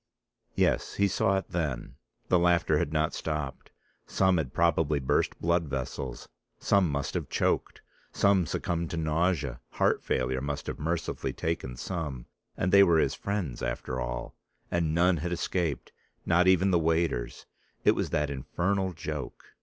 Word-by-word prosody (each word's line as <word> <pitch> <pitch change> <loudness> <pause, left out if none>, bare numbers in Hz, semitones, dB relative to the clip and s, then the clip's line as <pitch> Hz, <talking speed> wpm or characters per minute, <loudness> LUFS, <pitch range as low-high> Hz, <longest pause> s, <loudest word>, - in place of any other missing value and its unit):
Yes, - - +1
he 100 - +3
saw 95 0 +2
it 95 - -4
then: 75 -9 -2 0.3
the 90 - +4
laughter 85 0 +3
had 75 - -1
not 80 +1 +1
stopped, 75 -4 -4 0.4
some 95 -1 +3
had 70 -6 -2
probably 80 -3 +2
burst 65 - 0
blood 85 0 +1
vessels, 65 -2 -4 0.3
some 100 -4 +3
must 70 -1 -2
have - - -3
choked, - - 0 0.3
some 100 -4 +3
succumbed 85 +1 -2
to 85 - -4
nausea, 80 -4 0
heart - - +2
failure 65 0 0
must 70 +1 -3
have - - -5
mercifully 85 +2 -2
taken 65 -7 -3
some, 75 -9 -4 0.3
and 90 - 0
they 100 +1 +8
were 85 -4 +5
his - - +2
friends 100 -11 -3
after 65 +1 -3
all, - - -4 0.4
and 80 -2 +1
none 90 +1 +4
had 85 +3 -3
escaped, 85 -3 -2 0.3
not 90 +2 +4
I - - +8
even 95 +1 +4
the 85 - +4
waiters. 80 -6 0 0.4
It - - +7
was - - -1
that 75 -1 0
infernal 95 +7 -1
joke. 75 -2 -6
80 Hz, 160 wpm, -28 LUFS, 70-90 Hz, 0.4 s, they